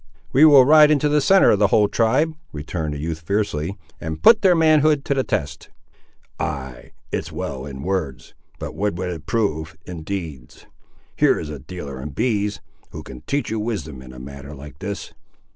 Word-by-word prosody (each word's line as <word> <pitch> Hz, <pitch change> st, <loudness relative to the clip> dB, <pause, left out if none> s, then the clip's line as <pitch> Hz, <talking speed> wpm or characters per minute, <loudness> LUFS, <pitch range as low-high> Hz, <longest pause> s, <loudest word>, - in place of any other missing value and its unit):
"We 140 Hz, +5 st, +7 dB
will 140 Hz, -4 st, +8 dB
ride 150 Hz, +1 st, +7 dB
into 150 Hz, -1 st, +3 dB
the 150 Hz, 0 st, +2 dB
centre 190 Hz, +7 st, +5 dB
of 100 Hz, -, +2 dB
the 105 Hz, -, +5 dB
whole 105 Hz, +1 st, +3 dB
tribe," 130 Hz, +10 st, +1 dB, 0.2 s
returned 75 Hz, 0 st, -4 dB
the -, -, -5 dB
youth 80 Hz, +2 st, -4 dB
fiercely, 95 Hz, 0 st, -2 dB, 0.2 s
"and 80 Hz, 0 st, -5 dB
put 230 Hz, -, +7 dB
their 185 Hz, -3 st, +5 dB
manhood 155 Hz, -3 st, +3 dB
to 140 Hz, -, +1 dB
the 135 Hz, -1 st, 0 dB
test." 70 Hz, -, -3 dB, 0.7 s
"Ay, 70 Hz, -5 st, -5 dB, 0.2 s
it's -, -, -3 dB
well 65 Hz, 0 st, -5 dB
in 70 Hz, -1 st, -8 dB
words, 90 Hz, -8 st, -3 dB, 0.2 s
but -, -, -6 dB
what 105 Hz, -2 st, -1 dB
would 90 Hz, +1 st, -3 dB
it 80 Hz, -4 st, -8 dB
prove 80 Hz, -9 st, -1 dB
in 85 Hz, -3 st, -7 dB
deeds? 80 Hz, -8 st, -7 dB, 0.5 s
Here -, -, +3 dB
is 75 Hz, -, -6 dB
a 75 Hz, -, -7 dB
dealer 70 Hz, -3 st, -8 dB
in 75 Hz, -, -6 dB
bees, 105 Hz, -, -1 dB, 0.3 s
who -, -, -9 dB
can 60 Hz, -2 st, -11 dB
teach 140 Hz, -3 st, -1 dB
you 110 Hz, -, -1 dB
wisdom 80 Hz, -, -4 dB
in 65 Hz, -1 st, -12 dB
a 65 Hz, -, -12 dB
matter 70 Hz, +3 st, -9 dB
like 70 Hz, 0 st, -12 dB
this." 100 Hz, +2 st, -6 dB
90 Hz, 190 wpm, -21 LUFS, -, 0.7 s, will